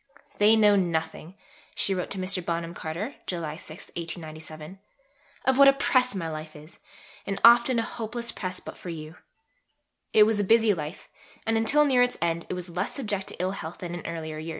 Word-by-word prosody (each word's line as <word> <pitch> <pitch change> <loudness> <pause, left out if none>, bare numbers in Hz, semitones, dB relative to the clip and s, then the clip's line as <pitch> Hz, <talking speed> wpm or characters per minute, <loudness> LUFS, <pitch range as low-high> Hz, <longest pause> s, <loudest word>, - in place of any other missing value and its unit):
"They 210 +2 +6
know 210 -2 +5
nothing," 165 -1 -2 0.4
she 195 - +2
wrote 180 -1 -3
to 200 - -2
Mr. 185 -1 -2
Bonham 170 0 -3
Carter 180 - -5
(July 165 -4 -3
6, 160 +1 -10
1897), 160 +1 -7 0.7
"of 265 +1 +3
what 280 - +9
a 275 - +8
press 255 -4 +2
my 175 -4 -3
life 155 0 -7
is, 150 +2 -13 0.5
and 195 0 -2
often 235 +1 +7
a 230 - +2
hopeless 235 +1 -4
press 185 -1 -5
but - - -10
for 180 - -8
you." 155 0 -8 0.9
It 215 - +7
was 215 0 +2
a - - +2
busy 225 +1 +4
life, 155 0 -6 0.4
and, 225 - +1
until 275 +7 +4
near 260 -3 +4
its 245 0 +2
end, 170 0 -1
it - - -2
was 180 0 -5
less 175 +1 -3
subject 205 -7 -3
to - - -6
ill 185 +1 0
health 175 -4 -6
than 175 -1 -6
in 175 - -6
earlier 160 -2 -5
years. 160 +1 -6
185 Hz, 195 wpm, -26 LUFS, 165-220 Hz, 0.9 s, what